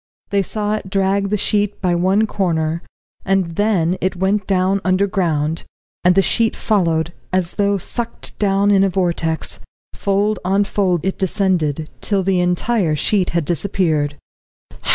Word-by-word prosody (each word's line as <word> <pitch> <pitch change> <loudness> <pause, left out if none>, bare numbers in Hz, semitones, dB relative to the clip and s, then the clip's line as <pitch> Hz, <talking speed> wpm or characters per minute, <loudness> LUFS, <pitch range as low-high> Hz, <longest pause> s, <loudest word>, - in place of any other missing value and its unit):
They 200 -1 +3
saw 210 +2 -2
it 215 -3 -4
drag 195 +1 +1
the 210 - +1
sheet 205 0 0
by 180 -2 +1
one 190 +5 +2
corner, 165 -5 -1 0.4
and 195 -3 +1
then 185 -4 +1
it 185 0 0
went 190 +2 0
down 190 0 +1
underground, 180 -5 0 0.4
and 180 0 +4
the 195 - +5
sheet 225 +2 +1
followed, 170 -6 0 0.2
as 185 -2 0
though 200 -1 +1
sucked 235 +5 -5
down 200 0 +2
in 195 -1 +5
a 195 - +3
vortex; 170 -3 -1 0.3
fold 200 +1 0
on 195 +2 +2
fold 185 -4 0
it 190 - -2
descended, 175 -6 0
till 200 -2 0
the 190 -1 +1
entire 180 0 +1
sheet 185 +5 +1
had 170 -2 -1
disappeared. 160 -4 0
190 Hz, 150 wpm, -19 LUFS, 175-200 Hz, 0.4 s, the